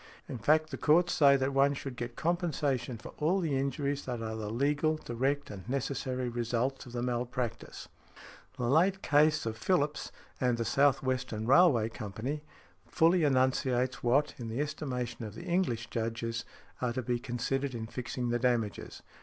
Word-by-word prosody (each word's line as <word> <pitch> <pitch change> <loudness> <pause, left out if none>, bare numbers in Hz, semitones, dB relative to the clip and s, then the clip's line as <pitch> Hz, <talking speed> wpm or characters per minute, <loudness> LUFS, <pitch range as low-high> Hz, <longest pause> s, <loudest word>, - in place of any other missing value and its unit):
In 125 - -6
fact, 155 +7 +3
the 130 - -5
courts 170 +3 +4
say, 140 -2 +6
that 135 +1 -1
one 140 +1 +4
should 135 -2 -6
get 120 -1 -5
compensation 150 -8 -1
for 110 - -10
all 170 +6 +2
the 160 -6 0
injuries 140 +1 -1
that 125 -2 -3
are 110 -1 -4
the 110 -2 -4
legal, 145 +6 +1
direct, 135 +1 -2
and 100 +2 -9
necessary 130 -1 -2
results 120 +3 -2
of 120 - -11
the 120 -1 -2
malpractice. 125 -1 -3 0.7
The - - -3
late 180 +8 +3
case 150 0 +3
of 110 0 -4
Phillips 150 +1 0 0.3
v. 125 -2 +2
The 115 0 -1
South 135 +3 +3
Western 125 -4 -2
Railway 130 -5 +5
Company 110 +8 -5 0.5
fully 170 +1 +3
enunciates 130 -3 +1
what, 135 +5 +2
in 120 - -5
the 115 +4 -3
estimation 125 -6 -3
of 105 -1 -7
the - - -8
English 170 -11 0
Judges, 115 0 -3 0.4
are 125 -2 0
to 130 - -3
be 120 0 -1
considered 130 +2 -2
in 110 -1 -4
fixing 120 +1 -4
the 120 0 +1
damages. 120 -6 -1
130 Hz, 170 wpm, -31 LUFS, 120-145 Hz, 0.7 s, say